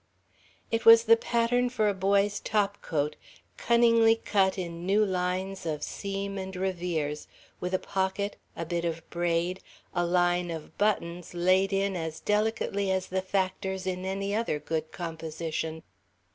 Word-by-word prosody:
It 230 0 0
was 230 0 +9
the 230 0 +7
pattern 240 +2 +1
for 220 -4 +1
a 205 - +2
boy's 200 +1 +2
topcoat, 195 -8 -1 0.4
cunningly 230 -1 +5
cut 195 -4 +1
in 170 -2 -5
new 205 +4 +3
lines 185 +1 -2
of 155 -3 -3
seam 200 0 -4
and 190 0 -6
revers, 175 -5 -2 0.3
with 180 - -3
a - - +3
pocket, 190 +2 -2 0.2
a 165 - -4
bit 170 +1 -2
of 165 -1 -3
braid, 175 +1 0 0.3
a 175 - +1
line 175 0 +2
of 160 -2 -7
buttons 180 -5 -1
laid 185 +3 +3
in 195 0 0
as 160 -2 -4
delicately 210 -2 0
as 190 -1 0
the 190 0 0
factors 190 0 -2
in 185 -1 -2
any 195 +1 -2
other 220 -8 0
good 160 +1 -3
composition. 160 -1 -4
190 Hz, 145 wpm, -28 LUFS, 170-200 Hz, 0.4 s, was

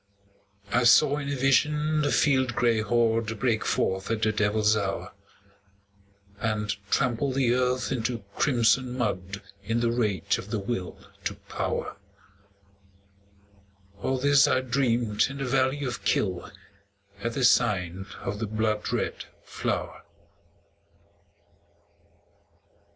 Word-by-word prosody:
I 125 - +3
saw 145 +4 +6
in 140 -1 -4
a - - -1
vision 150 +3 +2
the 145 - +1
field 130 -4 +2
gray 115 -2 +2
horde 115 -1 +1
Break 115 -3 +1
forth 95 +1 -1
at 110 -1 -1
the 110 - +3
devil's 105 +1 +2
hour, 100 -2 -3 1.3
And 105 -1 -1
trample 130 +5 +1
the 130 -2 +2
earth 125 +1 0
into 120 -3 -2
crimson 125 -1 +2
mud 100 -4 -3 0.2
In 115 +4 -1
the 120 0 +1
rage 105 -7 0
of - - -9
the - - -1
Will 100 -3 -4 0.3
to - - -2
Power, - - -4 2.0
All 130 +4 0
this 140 +1 +5
I 130 - +2
dreamed 120 -4 +1
in 135 - -7
the 135 - -3
valley 130 +2 +1
of 125 -2 -4
Kyll, 95 -4 0 0.7
At 115 +3 -3
the 130 - -2
sign 95 -6 +2 0.2
of 105 +1 -4
the 110 - -2
blood 110 0 -1
red - - -2 0.2
flower. - - -3
120 Hz, 125 wpm, -26 LUFS, 105-130 Hz, 2.0 s, saw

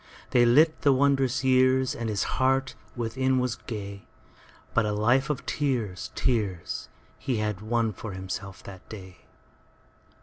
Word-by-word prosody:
They 120 -1 +5
lit 155 +7 +4
the 145 - +5
wondrous 135 -1 +2
yearsAnd 130 -2 +2
his 105 -2 0 0.2
heart 135 0 +2 0.2
within 130 +3 0
was 125 -2 0
gay; 100 -3 -7 0.7
But 115 -2 +2
a - - 0
life 120 +6 +2
of 145 -3 -2
tears, 120 -10 -2
tears, 105 -9 -1 0.3
He 130 -4 -1
had 105 -2 -2
won 115 0 0
for 105 +1 -7
himself 95 +1 -6
that 95 -2 -12
day. 95 -4 -10
120 Hz, 135 wpm, -27 LUFS, 105-130 Hz, 0.7 s, They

